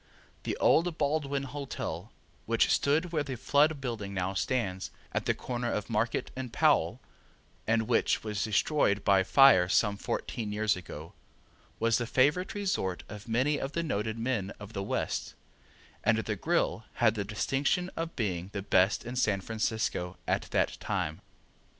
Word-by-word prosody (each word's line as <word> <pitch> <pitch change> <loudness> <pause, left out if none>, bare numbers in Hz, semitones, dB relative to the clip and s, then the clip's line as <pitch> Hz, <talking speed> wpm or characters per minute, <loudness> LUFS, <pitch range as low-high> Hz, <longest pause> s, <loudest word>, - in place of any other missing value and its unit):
The - - -2
old 170 0 +3
Baldwin 140 -2 0
Hotel, 140 0 -5 0.4
which - - +3
stood 155 +5 +1
where 155 -3 +1
the 140 -3 -4
Flood 145 +5 +2
building 110 -7 -4
now 95 +1 -1
stands, 95 -2 -1 0.2
at - - -2
the - - +2
corner 120 -1 -3
of 105 +2 -3
Market 115 +2 0
and 130 -2 -5
Powell - - +3 0.7
and 115 0 +3
which 115 +1 +1
was 105 -2 -2
destroyed 105 -1 +2
by 100 -2 +5
fire 95 -5 +6
some 105 0 +2
fourteen 105 +1 -3
years 110 +1 +1
ago, 80 -1 -9 0.7
was 115 +1 +2
the 120 - -2
favorite 150 - +2
resort 185 - -1
of 105 +1 -9
many 130 +6 +1
of 135 - -4
the 170 - -1
noted 110 -6 -2
men 115 -5 -1
of 105 +1 -10
the 100 - -3
West, 100 - -2 0.7
and 110 0 +3
the 110 -1 -2
grill 160 - 0
had 115 -3 +3
the 105 -3 -2
distinction 135 - 0
of 165 0 -4
being 95 -6 -2
the 100 -2 -3
best 95 +3 +3
in 120 +1 -5
San 105 -6 +2
Francisco 110 -4 -2
at - - 0
that - - +1
time. 75 +1 -2
115 Hz, 160 wpm, -30 LUFS, 100-140 Hz, 0.7 s, fire